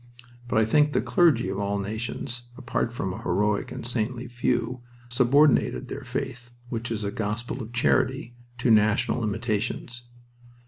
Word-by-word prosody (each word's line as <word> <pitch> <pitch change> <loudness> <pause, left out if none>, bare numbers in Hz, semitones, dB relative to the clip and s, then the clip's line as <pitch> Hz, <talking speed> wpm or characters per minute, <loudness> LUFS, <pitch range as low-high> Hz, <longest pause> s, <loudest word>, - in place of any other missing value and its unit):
But 120 - 0
I 110 - +5
think 150 +6 +3
the - - +3
clergy 160 -9 +3
of 95 - -3
all 100 0 0
nations, 115 +4 -4
apart 120 -1 -1
from 95 -6 -3
a - - -7
heroic 100 +3 0
and - - -6
saintly 120 +1 -2
few, 120 +1 -1 0.3
subordinated 135 +4 +3
their - - -5
faith, 120 0 -5 0.2
which 115 -1 -3
is 110 -2 -3
a 100 - -2
gospel 115 +5 -3
of 110 0 -7
charity, 120 +1 +1 0.2
to 120 0 +2
national 110 +2 +3
limitations. 115 +2 -2
120 Hz, 150 wpm, -26 LUFS, 105-125 Hz, 0.3 s, I